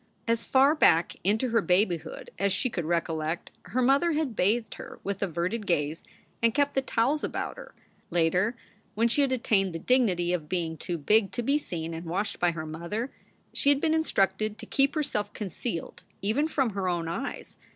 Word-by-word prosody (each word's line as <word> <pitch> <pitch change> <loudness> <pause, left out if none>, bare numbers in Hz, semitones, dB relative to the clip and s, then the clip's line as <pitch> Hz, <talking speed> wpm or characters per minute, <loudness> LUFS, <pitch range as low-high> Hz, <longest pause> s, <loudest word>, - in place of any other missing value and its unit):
As 230 0 +1
far 270 +3 +4
back 170 - +3
into 220 +7 +2
her 230 -1 +3
babyhood 180 -3 0
as 200 +1 +2
she 240 +6 0
could 175 -7 -3
recollect, 165 -1 -2
her 255 +1 0
mother 280 +6 +3
had 300 -6 -1
bathed 220 +5 +1
her - - -10
with 200 0 -3
averted 195 +4 -2
gaze 155 -2 0 0.4
and 230 +1 +3
kept 285 -1 +2
the 270 - +2
towels 265 +3 0
about - - -3
her. - - -11 0.3
Later, 180 +7 +2 0.4
when 230 +2 +3
she 235 +5 +3
had 275 -2 +2
attained 195 -7 +1
the - - 0
dignity 180 -5 +2
of 155 -4 -3
being 170 -3 -1
too 170 +2 -4
big 205 +7 +3
to 240 - -2
be 280 +5 +2
seen 165 - -5
and 165 +1 -6
washed 200 +5 -2
by 175 - +3
her 165 -2 -4
own 155 - -7
mother, 205 +10 -4 0.4
she 280 - +2
had 285 -1 +4
been 315 +1 +1
instructed 215 -8 +1
to - - -8
keep 275 +3 +2
herself 210 -9 -2
concealed 195 -2 -5 0.2
even 230 +10 +1
from 270 -7 0
her 195 -2 -2
own 170 -2 -1
eyes. 175 +12 -5
205 Hz, 195 wpm, -28 LUFS, 175-255 Hz, 0.4 s, far